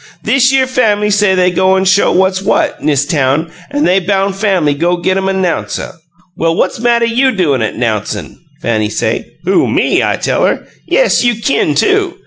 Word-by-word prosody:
Thishere 265 0 +3
fam'ly 215 -5 0
say 205 -2 +2
they 180 0 +2
goin' 190 +1 +1
show 190 +1 +3
what's 190 +1 +1
what, 195 - -1
'nis 145 -2 +1
town, 150 +1 0 0.2
an' 290 +1 -1
they 185 +2 +3
boun' 195 +1 -1
Fanny 190 -7 0
go 170 +5 0
git 185 +2 -1
'em 190 0 -1
a - - 0
'nouncer. 185 -3 -2 0.4
'Well, 165 0 0
what's 185 - -1
mattuh 235 0 +2
YOU 255 +3 +2
doin' 155 - 0
'at 110 - -2
'nouncin'?' 110 -3 -3 0.2
Fanny 110 -2 0
say. 110 +1 -3
'Who 190 +2 +2
me?' - - +1
I - - 0
tell - - -1
her. - - 0 0.2
'Yes, - - +2
you 240 -1 +2
kin, 230 +5 0
too!' 400 -3 +1
190 Hz, 180 wpm, -13 LUFS, 165-225 Hz, 0.4 s, Thishere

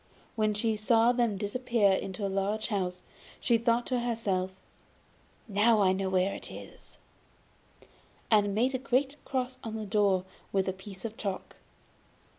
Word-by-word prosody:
When 215 -1 +1
she 220 +1 +1
saw 225 +2 +4
them 235 -4 +1
disappear 215 0 +2
into 190 +1 -2
a - - +1
large 195 +3 -1
house, 180 -4 -2 0.4
she 235 -2 +3
thought 235 +1 +2
to 250 -2 0
herself: 195 -6 -1 0.9
'Now 215 +2 +4
I 190 -2 +5
know 190 0 -1
where 190 +1 +2
it - - -7
is; - - -12 1.3
'and 205 -2 +4
made 250 +5 +2
a 260 - 0
great 270 +2 +1
cross 255 -1 -2
on 220 -1 -5
the 220 -1 -4
door 200 -3 +2 0.3
with 195 -1 +1
a 190 - 0
piece 190 +1 -10
of 225 -1 -5
chalk. 195 -3 -4
210 Hz, 155 wpm, -30 LUFS, 195-235 Hz, 1.3 s, I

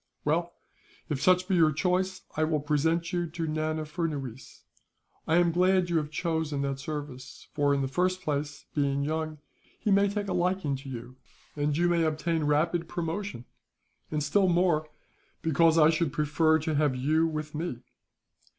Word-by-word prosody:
"Well, 170 +3 0 0.6
if 140 -3 -2
such 185 0 +4
be 195 - 0
your 160 -3 +5
choice, 180 +4 0
I 155 - +1
will 155 -1 +1
present 160 +4 0
you 175 -1 0
to 165 0 -4
Nana 155 0 -1
Furnuwees. 150 -6 -5 0.6
I 160 - +3
am 175 -1 +4
glad 185 +2 +3
that 175 - -7
you 170 - +3
have 150 -2 -1
chosen 155 -3 -1
that 135 -1 -2
service 135 -3 -7
for, 145 -1 +2
in 140 -1 +1
the - - 0
first 185 +6 0
place, 145 -2 -3
being 140 -1 0
young, 155 +1 -2 0.4
he 215 - 0
may 200 +1 +4
take 205 0 -3
a 185 - -1
liking 180 -5 0
to 135 +1 -10
you, 125 0 -8 0.4
and 145 0 0
you 175 +1 +3
may 170 -1 +2
obtain 160 0 0
rapid 165 +3 +1
promotion; 170 - -4 0.6
and 150 -1 -1
still 190 +6 +3
more, 170 -3 +2 0.5
because 165 +1 +4
I 155 0 +6
should 160 -2 0
prefer 150 +2 +2
to 160 +1 -2
have 145 -2 +2
you 155 +6 +2
with 155 -1 -4
me." 155 -6 -4
155 Hz, 175 wpm, -28 LUFS, 145-175 Hz, 0.6 s, I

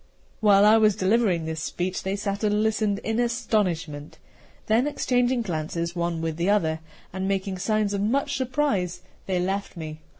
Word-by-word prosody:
While 205 -2 +5
I 215 +1 +7
was 215 -2 +4
delivering 190 -4 +2
this 160 -1 -4
speech, 180 +3 -3
they 190 +1 -2
sat 200 +1 -3
and 210 0 +2
listened 215 -2 +1
in 225 +1 -1
astonishment. 195 -11 -1 0.5
Then 230 +5 +2
exchanging 250 -3 +1
glances 170 -1 -3
one 170 -1 -1
with 160 -1 -2
the 170 +3 0
other, 160 -6 +2 0.3
and 190 +1 -2
making 195 -1 -2
signs 215 +1 0
of 200 - -1
much 245 +7 0
surprise, 240 -10 -1 0.2
they 185 -2 0
left 195 +1 -2
me. 155 -1 -6
200 Hz, 165 wpm, -25 LUFS, 175-220 Hz, 0.5 s, I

